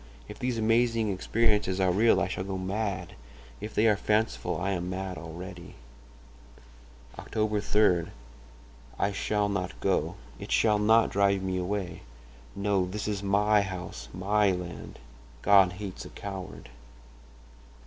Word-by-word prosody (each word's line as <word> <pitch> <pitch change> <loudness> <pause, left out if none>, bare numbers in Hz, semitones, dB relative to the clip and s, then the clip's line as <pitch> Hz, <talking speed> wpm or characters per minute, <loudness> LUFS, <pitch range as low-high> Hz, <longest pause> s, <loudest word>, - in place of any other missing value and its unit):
If 105 - -10
these 125 -2 -1
amazing 115 0 +2
experiences 105 -1 +1
are 95 -1 +3
real 110 +5 +4
I - - +1
shall 95 - -3
go 95 0 -4
mad; 100 +2 -3 0.5
if 105 +1 -7
they 110 - +3
are 110 -2 +5
fanciful 105 +2 0
I 100 +2 -1
am 90 -1 -2
mad 95 0 -4
already. 85 +2 -9 1.4
"Oct. - - -11
3.—I 85 - -1
shall 105 +1 0
not 100 -2 -3
go—it 90 -3 -3
shall 105 -2 +3
not 110 +2 +4
drive 100 -1 +2
me 95 -1 -1
away. 90 0 -3 0.5
No, 100 -2 +1
this 105 +3 -4
is 105 -2 -2
my 105 +1 +3
house, 90 -10 -6
my 100 +3 +2
land. 90 -1 -6 0.5
God 100 -3 +6
hates 95 0 -7
a - - -9
coward 95 -6 -8
100 Hz, 130 wpm, -28 LUFS, 90-105 Hz, 1.4 s, God